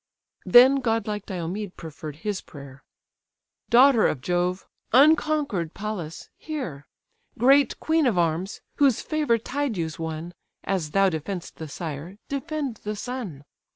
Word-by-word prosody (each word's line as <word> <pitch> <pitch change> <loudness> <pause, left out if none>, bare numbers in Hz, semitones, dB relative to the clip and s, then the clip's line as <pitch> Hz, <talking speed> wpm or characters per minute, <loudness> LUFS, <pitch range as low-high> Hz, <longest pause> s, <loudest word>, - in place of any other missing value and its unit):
Then 255 +3 +8
godlike 225 -5 -1
Diomed 185 +2 -5
preferr'd 155 -2 -8
his 205 -2 -1
prayer: 140 -2 -12 0.9
"Daughter 245 -1 +6
of 145 - -2
Jove, 180 +5 -1 0.3
unconquer'd 280 - +3
Pallas! 195 -6 -5
hear. 220 - -6 0.5
Great 275 +4 +4
queen 320 -3 +2
of 220 -7 +1
arms, 170 +3 0 0.2
whose 275 -5 +3
favour 300 -7 +1
Tydeus 225 - -3
won, 160 +1 -5 0.3
As 185 -6 -1
thou 195 +5 +3
defend'st 170 +3 -5
the 160 - -6
sire, 160 +4 -6
defend 280 -3 -3
the 210 +1 -5
son. 205 - -6
200 Hz, 120 wpm, -25 LUFS, 165-260 Hz, 0.9 s, Then